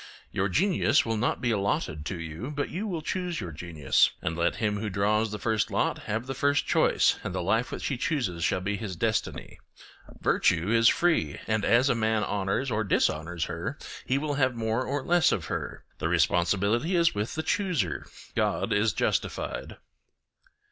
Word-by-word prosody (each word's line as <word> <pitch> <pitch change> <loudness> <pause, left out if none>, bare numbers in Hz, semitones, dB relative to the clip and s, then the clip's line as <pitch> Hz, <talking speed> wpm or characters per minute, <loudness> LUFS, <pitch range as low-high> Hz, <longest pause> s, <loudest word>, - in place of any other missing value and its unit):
Your 95 +1 0
genius 180 - +3
will 115 -1 -1
not 115 +3 0
be 120 - +1
allotted 100 -7 -1
to 90 - -4
you, 80 - -6
but 145 -1 -3
you 200 +6 -3
will 170 -6 -3
choose 180 0 -2
your 90 -6 -5
genius; 80 -3 +2
and 80 - -3
let 85 +1 +1
him 105 -2 -1
who 105 0 -3
draws 105 +3 +1
the 105 - -3
first 110 0 0
lot - - 0
have 110 +3 -1
the 135 - -4
first 145 +2 +1
choice, - - +3
and - - -4
the - - -1
life 110 +7 +1
which - - -5
he 135 - -1
chooses 120 - -1
shall 90 - +1
be 100 +2 -2
his 100 -3 -5
destiny. 110 +2 -2 0.6
Virtue 90 +3 +2
is 115 0 +5
free, 160 - +1
and 110 -1 0
as 120 +3 +4
a - - +3
man 110 -2 +1
honours 100 +7 -1
or 110 0 0
dishonours 80 -3 0
her 90 - -4 0.3
he 130 - 0
will 145 +1 -1
have 130 -3 +1
more 115 +2 -1
or 140 +1 -2
less 175 -1 +4
of 85 - -1
her; - - -5 0.2
the - - -1
responsibility 100 - +2
is 170 -1 +3
with 105 +2 -3
the 155 - -2
chooser—God 115 - -1
is 105 0 +2
justified. - - -2
110 Hz, 180 wpm, -27 LUFS, 95-135 Hz, 0.6 s, is